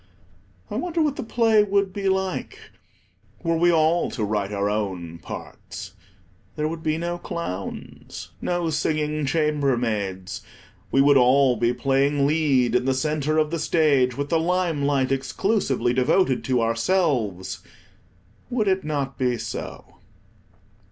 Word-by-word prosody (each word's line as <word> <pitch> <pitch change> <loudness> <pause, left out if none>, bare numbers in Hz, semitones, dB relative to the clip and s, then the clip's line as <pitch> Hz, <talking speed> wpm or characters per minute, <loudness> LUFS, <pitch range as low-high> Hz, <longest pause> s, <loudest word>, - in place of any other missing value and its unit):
I 210 - -2
wonder 340 +5 -2
what 295 -2 0
the - - -4
play 225 -2 +3
would 200 -2 0
be 195 -1 -1
like, 190 0 -3 0.7
were 165 -1 +1
we 175 +2 +4
all 165 +1 +2
to 110 - -4
write 105 -1 -1
our 100 0 -1
own 95 -6 -3
parts. - - -9 0.6
There 150 0 -1
would 160 +1 -5
be 155 -1 0
no 175 +1 -3
clowns, 100 - -6
no 175 -2 -1
singing 150 -1 -1
chambermaids. 120 - -1 0.5
We 135 - +4
would 140 0 +6
all 130 0 +5
be 120 +1 +1
playing 140 +2 +1
lead 140 -6 +2
in 125 0 +2
the 135 0 +1
centre 155 +2 0
of 155 0 +2
the 170 - -2
stage, 140 -6 +2
with 140 0 -3
the 165 - +2
lime 175 -2 0
light 135 -2 +1
exclusively 135 - 0
devoted 130 +2 +2
to 125 -3 +1
ourselves. 115 - 0 0.9
Would 235 -4 0
it 190 0 +1
not 140 -3 -3
be 125 -2 +1
so? - - -6
145 Hz, 140 wpm, -24 LUFS, 125-170 Hz, 0.9 s, would